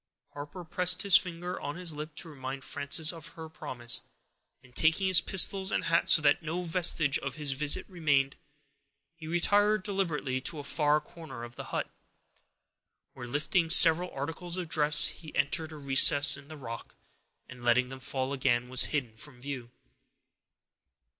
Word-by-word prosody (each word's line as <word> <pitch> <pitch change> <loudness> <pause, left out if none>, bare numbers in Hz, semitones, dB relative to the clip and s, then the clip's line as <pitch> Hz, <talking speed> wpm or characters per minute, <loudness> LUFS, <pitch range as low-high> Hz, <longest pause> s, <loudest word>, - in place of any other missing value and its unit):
Harper 145 +5 -9
pressed 180 +2 +3
his 200 -2 +5
finger 180 -1 0
on 145 - -6
his 175 -2 -4
lip, 150 +1 -8
to 170 - -6
remind 135 -2 -8
Frances 145 +3 +1
of 165 -1 -11
her 160 -1 -10
promise, 120 -6 -1 0.6
and, 125 -1 -21
taking 165 +4 +2
his 185 -3 +4
pistols 190 0 +2
and - - -1
hat, 165 -1 0
so 155 - +5
that 145 +2 +2
no 170 +3 -5
vestige 165 -4 +2
of 135 -2 -6
his 150 -2 -1
visit 145 +2 -1
remained, 145 -6 -1 0.8
he 165 -1 -12
retired 205 +5 +1
deliberately 160 -10 -3
to 155 - -4
a 145 - -7
far 150 +1 0
corner 150 -5 -12
of 120 0 -11
the - - -9
hut, - - -4 1.3
where, 125 -2 -10
lifting 160 +6 -1
several 175 +1 +6
articles 170 +5 -6
of 180 -2 -5
dress, 150 -2 +5
he 160 -3 -6
entered 160 +3 -1
a 155 - -10
recess 140 +1 +5
in 140 0 -12
the 155 0 -11
rock, 115 -4 -9 0.5
and, 125 0 -13
letting 125 +1 +1
them 130 0 -10
fall 130 +1 -4
again, 125 -3 -1
was 130 0 +4
hid 120 -7 -5
from 140 -4 -12
view. 130 -3 -7
150 Hz, 165 wpm, -28 LUFS, 135-170 Hz, 1.3 s, several